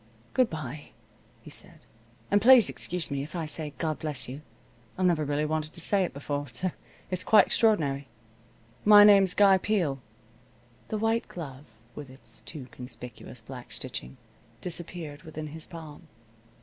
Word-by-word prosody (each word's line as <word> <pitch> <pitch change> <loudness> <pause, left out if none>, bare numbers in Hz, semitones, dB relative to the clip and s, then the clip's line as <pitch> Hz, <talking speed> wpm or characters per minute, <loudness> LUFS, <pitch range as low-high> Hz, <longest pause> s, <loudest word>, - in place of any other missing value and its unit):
"Good 255 -2 +3
bye," 150 -2 -7 0.5
he 150 - -12
said, 170 -1 -12 0.5
"and 205 0 +4
please 250 0 +7
excuse 180 -4 -3
me 140 -1 -1
if 150 +5 -8
I 165 -2 -2
say 150 -1 -1
God 155 +2 -2
bless 150 -4 -2
you. 135 +4 -7 0.6
I've 185 - +1
never 170 -4 +3
really 145 +1 0
wanted 155 0 -2
to - - -9
say 195 +3 +2
it 175 - -2
before, 145 0 -4
so 185 +4 -2 0.4
it's 185 0 -1
quite 210 -3 +6
extraordinary. 145 - +2 0.8
My 205 0 +9
name's 195 -3 +6
Guy 195 -2 +6
Peel." 175 -10 0 0.9
The 215 - -2
white 225 +2 0
glove, 145 -5 -8 0.3
with 145 -3 -9
its 115 -4 -12
too 150 -6 -8
conspicuous 125 -1 -9
black 120 0 -10
stitching, 125 +3 -4 0.4
disappeared 170 -4 -5
within 155 -1 -7
his 160 +1 -5
palm. 165 -1 -11
155 Hz, 155 wpm, -28 LUFS, 140-185 Hz, 0.9 s, My